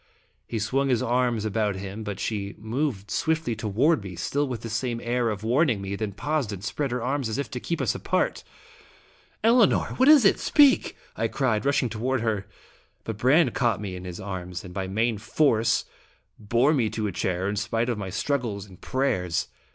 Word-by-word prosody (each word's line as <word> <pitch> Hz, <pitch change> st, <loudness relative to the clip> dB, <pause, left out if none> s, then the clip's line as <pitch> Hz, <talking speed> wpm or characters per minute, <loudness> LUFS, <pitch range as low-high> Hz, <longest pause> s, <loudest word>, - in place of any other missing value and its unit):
He 115 Hz, -, -3 dB
swung 130 Hz, +6 st, 0 dB
his 125 Hz, -1 st, +2 dB
arms 120 Hz, -2 st, +1 dB
about 105 Hz, -1 st, 0 dB
him, 100 Hz, +3 st, -6 dB
but 105 Hz, -2 st, -5 dB
she 100 Hz, -2 st, -3 dB
moved 110 Hz, -2 st, -3 dB
swiftly 160 Hz, -6 st, 0 dB
toward 115 Hz, +7 st, +1 dB
me, 95 Hz, -3 st, -7 dB
still 140 Hz, +12 st, -1 dB
with 125 Hz, -4 st, -4 dB
the 115 Hz, -, -6 dB
same 115 Hz, +1 st, -1 dB
air 120 Hz, 0 st, 0 dB
of 105 Hz, -1 st, -4 dB
warning 125 Hz, 0 st, +2 dB
me, 95 Hz, 0 st, -4 dB
then 105 Hz, 0 st, -3 dB
paused 135 Hz, +3 st, -1 dB
and 100 Hz, -2 st, -7 dB
spread 135 Hz, +7 st, -2 dB
her 120 Hz, -1 st, -2 dB
arms, 135 Hz, -2 st, -1 dB
as 110 Hz, -, -2 dB
if 140 Hz, -, -3 dB
to 125 Hz, -, -4 dB
keep 170 Hz, +6 st, -3 dB
us -, -, +1 dB
apart. -, -, -1 dB, 1.0 s
"Elinor! 230 Hz, -1 st, +4 dB
What 260 Hz, +3 st, +5 dB
is 295 Hz, -7 st, +8 dB
it? 195 Hz, -, +5 dB
Speak!" 290 Hz, -3 st, +4 dB, 0.2 s
I -, -, 0 dB
cried, 130 Hz, -3 st, 0 dB
rushing 140 Hz, -3 st, +2 dB
toward 120 Hz, +3 st, -1 dB
her. 110 Hz, -4 st, -1 dB, 0.6 s
But 110 Hz, -2 st, -5 dB
Brande 130 Hz, +2 st, +4 dB
caught 115 Hz, -6 st, +1 dB
me 100 Hz, -3 st, -5 dB
in 90 Hz, 0 st, -8 dB
his 90 Hz, -1 st, -6 dB
arms, 90 Hz, -2 st, -5 dB
and 90 Hz, -, -10 dB
by 95 Hz, 0 st, -3 dB
main 110 Hz, +3 st, 0 dB
force 115 Hz, -1 st, +2 dB, 0.5 s
bore 120 Hz, +8 st, +2 dB
me 120 Hz, -7 st, +1 dB
to 110 Hz, 0 st, -3 dB
a 105 Hz, -, -1 dB
chair 90 Hz, +1 st, -1 dB
in 100 Hz, -, -1 dB
spite 115 Hz, +3 st, -1 dB
of 120 Hz, -4 st, -1 dB
my 95 Hz, -2 st, -4 dB
struggles 105 Hz, -1 st, -2 dB
and 95 Hz, -3 st, -16 dB
prayers. 95 Hz, -11 st, -1 dB
115 Hz, 200 wpm, -26 LUFS, 100-130 Hz, 1.0 s, is